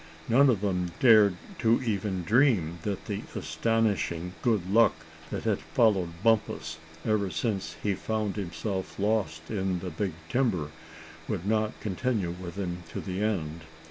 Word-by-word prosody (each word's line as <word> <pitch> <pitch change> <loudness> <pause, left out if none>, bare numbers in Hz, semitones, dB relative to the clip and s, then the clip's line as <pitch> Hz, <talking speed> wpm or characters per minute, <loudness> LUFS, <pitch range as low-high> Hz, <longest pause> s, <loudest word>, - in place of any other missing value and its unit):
None 135 +4 +6
of 110 -6 +2
them 90 -4 -1
dared 110 -6 +7 0.2
to 115 0 +4
even 100 -5 -1
dream 105 - +3
that 100 +1 -3
the 100 -1 -3
astonishing 100 -6 0
good 105 -7 +1
luck 115 +4 +5 0.3
that - - -4
had - - +1
followed 95 -6 +1
Bumpus 105 -8 +1 0.3
ever 105 -3 +1
since 95 -7 -2
he 100 - +2
found 105 +1 -2
himself 95 0 -4
lost 100 -6 -1
in 95 -3 0
the 90 0 -5
big 90 +3 -2
timber, 90 - 0 0.6
would 85 - -3
not 110 0 0
continue 105 -2 -1
with 90 0 -7
him 90 -3 -3
to - - -3
the 95 0 -4
end. 85 -7 -1
100 Hz, 145 wpm, -28 LUFS, 90-110 Hz, 0.6 s, dared